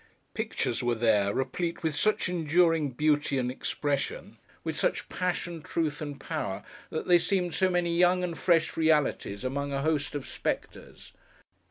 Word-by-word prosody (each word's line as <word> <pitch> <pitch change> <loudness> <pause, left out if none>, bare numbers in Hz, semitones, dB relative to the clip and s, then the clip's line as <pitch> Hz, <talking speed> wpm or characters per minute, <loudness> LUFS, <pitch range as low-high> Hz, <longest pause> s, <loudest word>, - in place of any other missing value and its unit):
Pictures 120 +2 -2
were 120 -1 +1
there, 110 -3 +3
replete 165 - -2
with 160 -2 0
such 215 +5 +1
enduring 165 -2 +2
beauty 145 +1 +1
and 125 -1 0
expression: 140 +1 -3 0.2
with - - -3
such - - 0
passion, 175 -2 -2
truth 160 -3 -2
and 145 -2 -5
power: - - -4 0.3
that - - -4
they 175 -1 +6
seemed 180 -2 0
so 190 -1 +3
many 175 -1 +1
young 180 +1 +4
and 175 -2 -2
fresh 170 -2 +2
realities 150 -9 +1
among 140 +2 -2
a 140 0 -1
host 150 -2 0
of 145 - -3
spectres. - - -5
155 Hz, 155 wpm, -28 LUFS, 140-175 Hz, 0.3 s, they